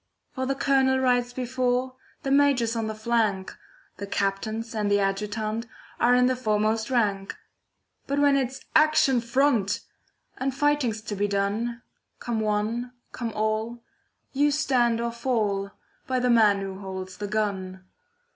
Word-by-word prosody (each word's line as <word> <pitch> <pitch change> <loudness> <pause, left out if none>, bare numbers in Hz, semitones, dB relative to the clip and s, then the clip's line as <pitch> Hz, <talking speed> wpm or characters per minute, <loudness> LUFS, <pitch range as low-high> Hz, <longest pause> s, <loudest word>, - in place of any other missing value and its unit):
For 260 0 -3
the 275 - 0
Colonel 270 -1 +3
rides 245 -2 +2
before, 255 0 -1 0.3
The 270 - -1
Major's 275 -5 +3
on 225 -1 -1
the 220 - -4
flank, 215 -4 0 0.4
The 200 +1 -6
Captains 215 +4 -2
and 210 -2 -1
the 205 0 +3
Adjutant 215 +3 -2 0.3
Are 245 +1 +4
in 250 0 +4
the 255 0 +2
foremost 220 -1 0
rank. 205 -6 0 0.7
But 280 - -1
when 285 -1 +4
it's 265 -1 -1
'Action 310 -5 +4
front!' 235 -4 +1 0.6
And 265 0 -1
fighting's 270 -6 +1
to 210 - -4
be 205 +1 0
done, 210 +4 -1 0.4
Come 235 -2 -2
one, 220 +3 -1 0.2
come 235 -2 -4
all, 220 +2 -2 0.5
you 290 +2 +3
stand 250 -5 +2
or 235 0 -1
fall 220 -5 -1 0.4
By 260 - 0
the 250 0 +2
man 210 -4 +5
who 195 -1 -6
holds 190 -1 -7
the 205 - -4
gun. 190 -3 -2
230 Hz, 145 wpm, -26 LUFS, 210-255 Hz, 0.7 s, man